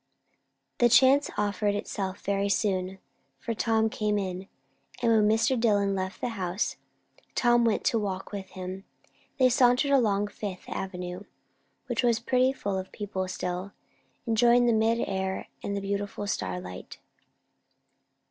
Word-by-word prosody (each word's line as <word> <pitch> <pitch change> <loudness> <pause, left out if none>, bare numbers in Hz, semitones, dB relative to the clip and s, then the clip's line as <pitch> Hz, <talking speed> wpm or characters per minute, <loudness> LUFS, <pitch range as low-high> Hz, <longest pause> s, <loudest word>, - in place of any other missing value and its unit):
The 240 - +5
chance 260 +4 +5
offered 205 0 0
itself 195 -1 -4
very 200 0 0
soon; 190 -2 0 0.4
for 230 - -4
Tom 225 0 +1
came 210 -1 -1
in, 190 -1 -4 0.5
and 235 -2 +2
when 215 -2 +4
Dillwyn 220 -3 +2
left 190 +1 -4
the 245 - -1
house, 190 -3 -2 0.6
Tom 240 -1 +4
went 225 -2 +1
to 230 - +2
walk 195 -2 -4
with 195 -2 -6
him. 185 +1 -7 0.5
They 260 -2 +5
sauntered 250 +3 +3
along 210 -6 +2
Fifth 200 -3 -7
Avenue, 180 0 -5 0.6
which - - -1
was 235 -2 +2
pretty 255 +2 +2
full 200 -7 -3
of 185 - -8
people 190 -3 -4
still, 180 +1 -4 0.5
enjoying 240 +1 +4
the 235 - +4
mild 225 +1 +2
air 190 0 -3
and 200 0 -2
beautiful 200 +1 -3
starlight. 90 - -5
205 Hz, 135 wpm, -28 LUFS, 190-230 Hz, 0.6 s, The